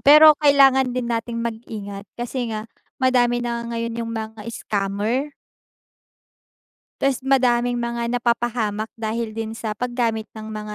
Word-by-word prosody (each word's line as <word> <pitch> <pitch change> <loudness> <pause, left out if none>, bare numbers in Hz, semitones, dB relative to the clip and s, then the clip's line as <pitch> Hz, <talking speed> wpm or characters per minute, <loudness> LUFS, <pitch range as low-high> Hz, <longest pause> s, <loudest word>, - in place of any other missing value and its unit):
pero 305 +2 +9
kailangan 270 -3 +5
din 240 -1 -2
nating 230 0 -2
mag-ingat 210 -3 -6
kasi 240 0 -3
nga 215 -1 -4 0.3
madami 245 -2 +2
na 235 0 -3
ngayon 230 0 -3
yung 230 0 -4
mga 220 -1 -5
scammer. 215 +7 -2 1.7
Ta's 270 -2 +1
madaming 245 -2 +3
mga 235 0 -2
napapahamak 235 -2 -1
dahil 225 0 -2
din 225 0 -5
sa 220 -2 -3
paggamit 235 -2 -1
ng 220 0 -7
mga 210 0 -6
235 Hz, 130 wpm, -22 LUFS, 220-245 Hz, 1.7 s, pero